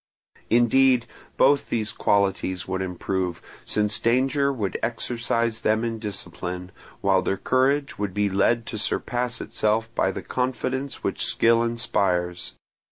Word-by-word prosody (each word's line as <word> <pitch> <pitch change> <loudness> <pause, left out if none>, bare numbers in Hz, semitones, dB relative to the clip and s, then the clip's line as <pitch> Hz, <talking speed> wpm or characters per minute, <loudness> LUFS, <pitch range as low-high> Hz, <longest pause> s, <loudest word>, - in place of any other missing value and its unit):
Indeed, 120 +1 +4 0.3
both 140 +1 +4
these 110 -2 -1
qualities 95 -2 0
would 95 0 -2
improve, 90 -1 -2 0.3
since 105 -1 +1
danger 135 +4 +2
would 105 -8 -3
exercise 115 -1 -1
them 110 +1 +2
in 115 -1 -2
discipline, 90 -3 -5 0.3
while - - +3
their 95 - -1
courage 140 +5 +1
would 100 -3 -3
be 105 0 +2
led 115 +4 +2
to 110 - -5
surpass 120 +2 -2
itself 110 +2 0
by 95 - +1
the - - -6
confidence 130 +2 -2
which - - -1
skill 115 0 +3
inspires. 90 -6 -1
115 Hz, 130 wpm, -24 LUFS, 95-125 Hz, 0.3 s, Indeed